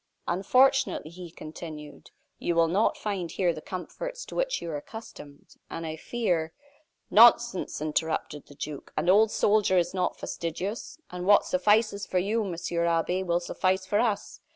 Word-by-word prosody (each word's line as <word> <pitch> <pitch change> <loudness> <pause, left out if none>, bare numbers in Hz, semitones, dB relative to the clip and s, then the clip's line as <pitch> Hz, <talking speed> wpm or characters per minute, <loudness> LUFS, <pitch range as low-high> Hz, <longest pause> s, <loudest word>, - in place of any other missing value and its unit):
"Unfortunately," 255 - +2
he 175 0 -9
continued, 155 -1 -10 0.3
"you 170 - -1
will 165 0 +4
not 195 +7 +1
find 195 -5 -3
here 175 -1 0
the 155 - -8
comforts - - -6
to - - -11
which - - 0
you 170 - -5
are - - -3
accustomed, 145 -4 -10 0.2
and 165 - -5
I 160 0 -4
fear 170 -4 -1 0.3
" 315 +3 -46
"Nonsense!" 235 -2 +5
interrupted 155 -1 -2
the 145 - -14
duke. 145 0 -7
"An 175 - +1
old 215 +3 +5
soldier 205 -3 +2
is 175 0 +1
not 180 -1 -1
fastidious, 185 - -5
and 180 0 -5
what 205 - +6
suffices 205 +2 +2
for 185 - -1
you, 210 +5 +1
Monsieur 170 -2 -2
Abbe, 170 +2 +1
will 175 -2 +1
suffice 185 +2 -1
for 205 +2 +1
us. 220 -4 -1
180 Hz, 165 wpm, -27 LUFS, 165-210 Hz, 0.3 s, what